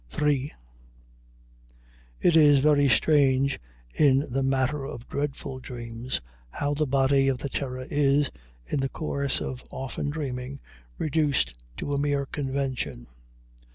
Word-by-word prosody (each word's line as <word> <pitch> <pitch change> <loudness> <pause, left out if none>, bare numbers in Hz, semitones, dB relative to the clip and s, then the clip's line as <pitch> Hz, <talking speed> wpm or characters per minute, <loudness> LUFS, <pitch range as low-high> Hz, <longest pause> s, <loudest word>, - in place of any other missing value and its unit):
III 145 -1 +1 1.7
It 170 - +4
is 150 -3 +7
very 145 0 +4
strange, 135 +1 +3 0.3
in 135 -2 +4
the 135 - +1
matter 135 +2 +1
of 135 -4 -7
dreadful 140 -2 -3
dreams, 120 0 -5 0.3
how 145 - -1
the 150 +1 0
body 135 0 +3
of 135 -2 +2
the 140 +3 -4
terror 130 -2 -3
is, 145 0 +2 0.3
in 145 - -1
the 135 0 0
course 140 -3 -2
of 130 -1 -5
often 135 +2 -4
dreaming, 135 -3 -4 0.4
reduced 145 - +1 0.2
to 145 - -3
a 140 - +1
mere 145 -1 +1
convention. 135 - -3
140 Hz, 125 wpm, -27 LUFS, 130-145 Hz, 1.7 s, is